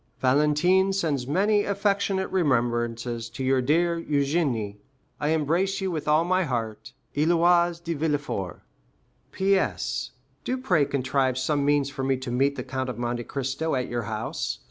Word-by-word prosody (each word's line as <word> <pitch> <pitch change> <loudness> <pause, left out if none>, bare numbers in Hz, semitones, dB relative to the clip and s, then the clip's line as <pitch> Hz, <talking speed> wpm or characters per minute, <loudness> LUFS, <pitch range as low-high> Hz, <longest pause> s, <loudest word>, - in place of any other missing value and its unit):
Valentine 150 +8 +3
sends 155 -10 -1
many 205 +7 +2
affectionate 200 -1 0
remembrances 120 -7 0
to 120 +3 -6
your 130 0 +2
dear 170 +5 +1
Eugénie. 140 -9 0 0.4
I 145 - -1
embrace 165 +5 +1
you 190 -1 -2
with 155 -3 -4
all 155 +2 +4
my 185 +1 +2
heart. 115 -7 -4 0.2
Héloïse 170 +2 +3
de 170 0 -2
Villefort. 145 - -2 0.7
P.S.—Do 195 +5 -1
pray 180 - +2
contrive 130 -1 0
some 140 +2 0
means 145 -1 +2
for 135 -1 -5
me 135 0 +1
to 130 -1 -6
meet 135 +3 +2
the 125 - -4
Count 130 0 -3
of 125 - -5
Monte 120 0 -2
Cristo 135 +3 -2
at 125 -1 -2
your 120 0 -2
house. 110 0 -3
145 Hz, 145 wpm, -26 LUFS, 130-175 Hz, 0.7 s, all